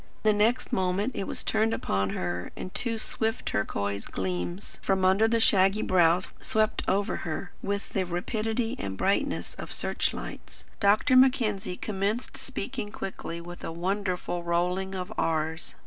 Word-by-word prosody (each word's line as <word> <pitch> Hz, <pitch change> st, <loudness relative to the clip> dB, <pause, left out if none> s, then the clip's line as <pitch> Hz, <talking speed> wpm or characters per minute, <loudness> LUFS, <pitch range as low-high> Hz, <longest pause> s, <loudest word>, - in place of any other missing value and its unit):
The 215 Hz, -1 st, +5 dB
next 220 Hz, +4 st, +2 dB
moment 190 Hz, +5 st, +1 dB
it 195 Hz, -, -2 dB
was -, -, -3 dB
turned 220 Hz, +1 st, +2 dB
upon 95 Hz, 0 st, 0 dB
her 90 Hz, -1 st, -3 dB
and 185 Hz, -, -6 dB
two 230 Hz, -1 st, -1 dB
swift 225 Hz, +1 st, 0 dB
turquoise 100 Hz, -1 st, -1 dB
gleams 95 Hz, -, -4 dB
from 190 Hz, -1 st, +2 dB
under 195 Hz, +4 st, +5 dB
the 230 Hz, 0 st, +2 dB
shaggy 195 Hz, -1 st, +5 dB
brows 175 Hz, 0 st, +4 dB
swept 215 Hz, 0 st, +1 dB
over 200 Hz, +1 st, +1 dB
her, 175 Hz, +3 st, -4 dB
with 200 Hz, 0 st, -2 dB
the 190 Hz, -, 0 dB
rapidity 220 Hz, +6 st, -1 dB
and 95 Hz, -1 st, -4 dB
brightness 240 Hz, +9 st, 0 dB
of -, -, -6 dB
search -, -, 0 dB
lights. -, -, -8 dB
Dr. 210 Hz, +5 st, +4 dB
Mackenzie 225 Hz, -8 st, +3 dB
commenced 210 Hz, +4 st, -2 dB
speaking 255 Hz, -3 st, -4 dB
quickly, 170 Hz, -4 st, -5 dB
with 175 Hz, +1 st, -9 dB
a -, -, -3 dB
wonderful 180 Hz, 0 st, -1 dB
rolling 180 Hz, +3 st, 0 dB
of 185 Hz, +3 st, -4 dB
r's. 160 Hz, 0 st, -1 dB
190 Hz, 150 wpm, -28 LUFS, 175-215 Hz, -, The